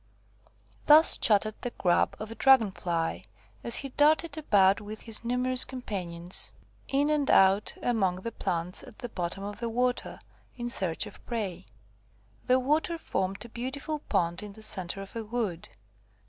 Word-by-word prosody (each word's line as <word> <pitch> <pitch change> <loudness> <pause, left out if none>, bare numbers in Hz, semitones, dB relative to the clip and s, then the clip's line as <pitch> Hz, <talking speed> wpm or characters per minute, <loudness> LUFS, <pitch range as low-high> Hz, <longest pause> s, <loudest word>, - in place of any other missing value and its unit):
Thus 310 +2 +8
chattered 215 0 +2
the 245 - -2
Grub 180 -6 +1
of 215 +1 -6
a - - -4
Dragon 230 -3 +5
fly, 170 -3 -2 0.4
as 235 - 0
he 275 - 0
darted 305 +3 +2
about 200 -10 +3
with 215 +1 -8
his 225 -1 +2
numerous 250 +1 +1
companions, 180 -8 -3 0.4
in 285 +2 +1
and 295 -2 +1
out 195 +2 +4
among 200 -7 +1
the 190 +6 -6
plants 175 -3 -3
at - - -14
the 245 - -7
bottom 180 -1 -4
of 205 0 -6
the 235 -1 -2
water, 250 +2 -1 0.4
in 240 -1 -4
search 185 -3 -1
of 210 - -13
prey. 200 - -4 0.8
The 255 +1 +4
water 305 +6 0
formed 195 - -3
a - - -11
beautiful 270 +6 -4
pond 170 - -1
in 210 -1 -8
the 220 +1 -9
centre 195 -2 -2
of 195 - -14
a 230 - -3
wood. 215 -6 -3
220 Hz, 160 wpm, -28 LUFS, 190-255 Hz, 0.8 s, Thus